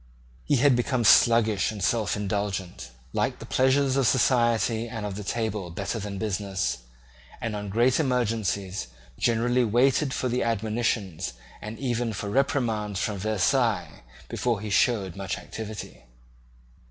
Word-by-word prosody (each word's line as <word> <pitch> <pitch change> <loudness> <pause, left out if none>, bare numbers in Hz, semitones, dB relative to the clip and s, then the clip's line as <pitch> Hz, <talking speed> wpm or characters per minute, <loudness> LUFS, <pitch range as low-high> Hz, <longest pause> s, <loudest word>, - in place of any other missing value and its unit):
He 145 - +2
had 135 0 +4
become 120 0 0
sluggish 110 -2 +5
and 105 -3 -6
self 110 +1 +1
indulgent, 100 - -3 0.2
liked - - 0
the - - -9
pleasures 130 +1 +2
of 135 -3 +3
society 120 -2 +2
and 110 -3 -5
of 105 - -3
the 105 +2 -6
table 105 -3 -2
better 100 +6 -3
than 100 -1 -5
business, 95 - -2 0.6
and 115 -2 -3
on 105 -1 -5
great 120 +6 +3
emergencies 110 - -1 0.3
generally 120 +2 +2
waited 130 +5 +2
for 130 - -2 0.2
admonitions 110 - -1 0.3
and 105 +2 -7
even 120 -3 -1
for 100 0 -4
reprimands 115 -7 0
from 100 -1 -2
Versailles 110 +3 0 0.3
before 120 -4 -1
he 105 -1 -5
showed 100 -4 +2
much 100 -1 -3
activity. 110 - -8
110 Hz, 135 wpm, -26 LUFS, 100-120 Hz, 0.6 s, sluggish